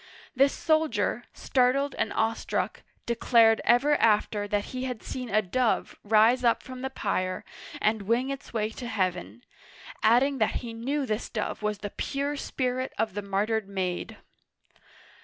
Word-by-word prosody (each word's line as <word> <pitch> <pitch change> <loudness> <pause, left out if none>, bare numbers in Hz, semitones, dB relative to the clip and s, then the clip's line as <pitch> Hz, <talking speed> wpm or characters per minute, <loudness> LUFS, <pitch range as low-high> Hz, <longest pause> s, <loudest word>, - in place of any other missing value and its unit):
This 275 +2 +4
soldier, 315 -1 0
startled 270 +2 +1
and - - -1
awestruck, 225 0 -1 0.2
declared 230 -1 +4
ever 275 +5 +4
after 210 -1 +2
that 205 0 0
he 255 0 -3
had 250 -4 -5
seen 250 -2 -5
a 215 +1 +2
dove 235 +5 0
rise 225 +4 +4
up 235 -1 +2
from 255 -1 -8
the 265 - -2
pyre 185 -7 -2 0.3
and 215 0 +1
wing 235 +6 0
its 275 - -7
way 220 -1 -1
to 240 +2 -7
heaven, 185 +1 -2 0.6
adding 255 +5 +4
that 220 - +1
he 230 - -6
knew 270 +5 -2
this 215 -1 -3
dove 215 -1 -3
was 210 -1 -1
the 205 0 -6
pure 280 +1 -2
spirit 255 -2 -2
of 220 -2 0
the 205 - -3
martyred 205 +1 -1
maid 185 -2 -3
230 Hz, 155 wpm, -27 LUFS, 210-255 Hz, 0.6 s, This